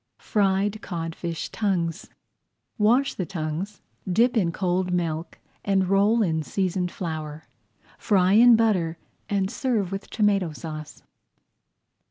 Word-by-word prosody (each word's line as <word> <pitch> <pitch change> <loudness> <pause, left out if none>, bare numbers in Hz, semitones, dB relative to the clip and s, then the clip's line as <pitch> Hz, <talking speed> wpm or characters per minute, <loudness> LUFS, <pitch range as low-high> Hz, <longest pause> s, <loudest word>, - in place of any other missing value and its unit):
FRIED 200 +1 0
CODFISH 165 -1 -4
TONGUES 185 -4 -2 0.7
Wash 245 +6 +3
the 185 - -3
tongues, 175 +3 -4 0.3
dip 235 +7 +3
in 185 -7 +2
cold 180 0 -1
milk 165 -2 -2 0.3
and 195 -2 +1
roll 205 +4 +3
in 160 -4 0
seasoned 180 +2 -1
flour. 155 -3 -5 0.6
Fry 190 -2 +3
in 235 +2 +8
butter, 185 -8 +1 0.3
and 195 -1 0
serve 220 -8 -1
with 195 +1 -5
tomato 200 -6 +1
sauce. 155 -1 -8
190 Hz, 115 wpm, -25 LUFS, 165-205 Hz, 0.7 s, in